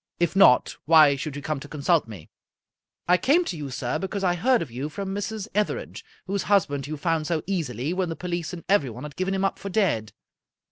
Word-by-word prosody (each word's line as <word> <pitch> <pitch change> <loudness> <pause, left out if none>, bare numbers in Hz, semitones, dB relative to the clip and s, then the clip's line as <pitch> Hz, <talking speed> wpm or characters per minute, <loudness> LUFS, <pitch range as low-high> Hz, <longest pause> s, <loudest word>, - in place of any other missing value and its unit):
If 175 +1 +1
not, 195 -10 +5
why 155 -3 +6
should 140 +1 -5
you 145 - -7
come 155 -1 -2
to 140 - -10
consult 150 0 +1
me?" 100 -8 -10 0.4
" - - -54
I 180 +1 +5
came 320 - +3
to 180 - -3
you, 145 -3 -6
sir, 125 -1 -3
because 195 +1 -4
I 180 -2 +3
heard 235 +5 +2
of 140 - -11
you 130 +5 -4
from 195 +5 -5
Mrs. 205 +1 -4
Etherege, 210 - -2 0.2
whose 195 +1 -1
husband 145 -9 +2
you 155 +1 -5
found 160 0 -1
so 165 -3 -1
easily 155 - -2
when 185 -1 -1
the 165 - -3
police 175 -1 -4
and 175 -2 -8
everyone 135 - +1
had 150 -1 -8
given 190 +1 -1
him 195 0 0
up 195 - -1
for 200 - -6
dead. 175 - 0
170 Hz, 225 wpm, -25 LUFS, 145-195 Hz, 0.4 s, why